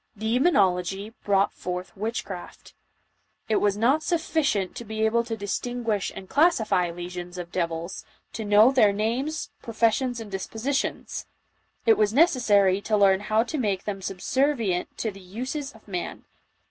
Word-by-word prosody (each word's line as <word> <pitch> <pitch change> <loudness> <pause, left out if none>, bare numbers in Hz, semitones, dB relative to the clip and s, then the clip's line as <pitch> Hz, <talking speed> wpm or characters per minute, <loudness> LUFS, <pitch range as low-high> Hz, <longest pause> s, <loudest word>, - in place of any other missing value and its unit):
Demonology 205 - +1
brought 195 -1 +2
forth 180 0 -5
witchcraft. 205 -3 -6 0.7
It 220 - +2
was 205 -1 +2
not 260 +8 +3
sufficient 315 - 0
to - - -5
be 220 0 -1
able 235 +2 +2
to 230 -1 -4
distin 240 +4 -3
guish 210 -4 0
and 190 - -8
classify 230 - +3
legions 175 +1 -7
of 175 -1 -6
devils, 170 0 -3 0.3
to 220 - -4
know 210 +4 +6
their 230 -6 +5
names, 245 +9 -2
professions 235 +2 +1
and 220 -3 -8
dispositions; 225 +8 -3 0.6
it 225 -1 +5
was 210 0 +3
necessary 205 - +4
to 215 +1 +1
learn 195 -2 +5
how 215 +2 +1
to 285 +5 -4
make 200 -5 0
them 195 -2 -4
subservient 210 0 -1
to 220 - -2
the 195 0 -13
uses 255 +10 -5
of 220 -4 -19
man. 180 -3 -5
215 Hz, 145 wpm, -26 LUFS, 190-245 Hz, 0.7 s, know